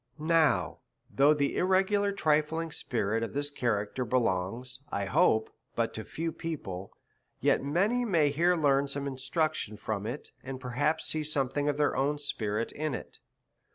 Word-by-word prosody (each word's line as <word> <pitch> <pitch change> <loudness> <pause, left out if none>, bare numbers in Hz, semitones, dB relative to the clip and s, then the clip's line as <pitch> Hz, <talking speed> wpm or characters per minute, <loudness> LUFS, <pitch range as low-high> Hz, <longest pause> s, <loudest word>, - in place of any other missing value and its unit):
Now, 155 - +2 0.3
though 145 +3 +5
the 140 -1 0
irregular 195 +2 +3
trifling 160 -2 +1
spirit 115 -5 -1
of 115 - -3
this 145 +1 -2
cha 130 -3 -3
racter 105 +3 0
belongs, 120 +1 -1
I 100 - -1
hope, 110 +3 +3 0.2
but 115 -1 0
to 110 - -5
few 165 +6 -3
people, 100 - -5 0.5
yet - - +2
many 195 - +1
may 165 -10 +3
here 170 +5 +3
learn 140 -3 +3
some 140 0 -4
instruction 140 - -2
from 105 -1 -3
it, 145 - -3
and 130 0 -6
perhaps 145 +5 0
see 155 -1 -2
something 145 -1 +1
of 145 - -1
their 150 -1 +2
own 145 +2 +1
spirit 115 -6 -2
in 155 -3 -2
it. - - -9
140 Hz, 155 wpm, -30 LUFS, 115-155 Hz, 0.5 s, though